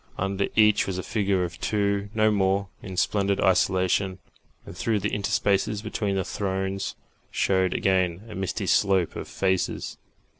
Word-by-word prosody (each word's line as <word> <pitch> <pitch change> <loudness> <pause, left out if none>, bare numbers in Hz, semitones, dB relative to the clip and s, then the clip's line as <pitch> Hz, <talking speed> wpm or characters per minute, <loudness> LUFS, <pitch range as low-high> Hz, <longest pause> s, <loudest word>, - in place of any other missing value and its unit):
Under 100 +1 -1
each 105 -1 +4
was 95 -2 -2
a 95 - -3
figure 100 -4 0
or - - -3
two 100 +2 -1
no 110 0 +4
more 100 -1 +1
in 95 -3 -8
splendid 100 0 +1
isolation, 95 0 +2 0.5
and - - -10
through 115 -2 0
the - - -2
interspaces 100 +1 0
between 105 -2 -2
the 95 - 0
thrones 95 0 -3 0.3
showed 95 -1 +1
again 95 -1 +1
a 110 - -9
misty 95 -1 -3
slope 95 -4 +2
of - - -6
faces. 95 -1 -1
95 Hz, 150 wpm, -25 LUFS, 95-100 Hz, 0.5 s, each